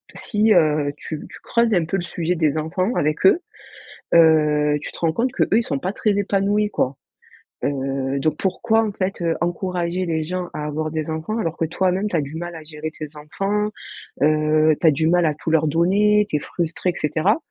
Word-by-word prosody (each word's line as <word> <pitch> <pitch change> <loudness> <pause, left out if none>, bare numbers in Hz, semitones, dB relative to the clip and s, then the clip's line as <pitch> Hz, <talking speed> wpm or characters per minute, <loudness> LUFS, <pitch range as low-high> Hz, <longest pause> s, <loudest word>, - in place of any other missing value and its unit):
si, 215 0 +1
heu, 150 -5 +3
tu 155 0 -6
tu - - -12
creuses 235 -1 +1
un 175 -4 +2
peu 170 - -2
le 175 - -3
sujet 170 0 -2
des 155 -2 +1
enfants 185 +8 -1
avec 150 +4 0
eux, 315 - +6 0.7
heu, 150 -2 +4
tu - - -6
te - - -11
rends 165 -2 +1
compte 245 +8 0
que - - +1
eux, 220 - +2
ils - - -1
sont 140 - -2
pas 185 +6 -3
très 215 - +1
épanouis, 205 +1 +1
quoi, 135 -9 -1 0.7
heu, 135 -1 -1
donc 155 +2 0
pourquoi, 220 +4 +1
en 205 - -5
fait, 190 -1 -3
heu, 165 -1 +1
encourager 175 +1 -1
les 160 -2 -1
gens 180 +2 -3
à 150 - -4
avoir 155 +1 -3
des 155 0 -3
enfants 160 +8 -3
alors 165 -6 -2
que 165 - 0
toi-même 185 +5 0
tu 205 - -3
as 160 - +2
du 145 +2 -7
mal 175 +1 -5
à 160 - -9
gérer 155 0 -6
tes 155 - -5
enfants, 195 +8 -2 0.6
heu, 155 0 +3
tu 170 - +3
as - - +7
du 160 +2 0
mal 175 0 +3
à 155 - +2
tout 155 - -5
leur 160 -1 +3
donner, 200 +7 +3
tu 150 - +1
es - - -3
frustré 170 +4 -2
et - - -14
cetera? 160 - +1
165 Hz, 220 wpm, -21 LUFS, 155-190 Hz, 0.7 s, as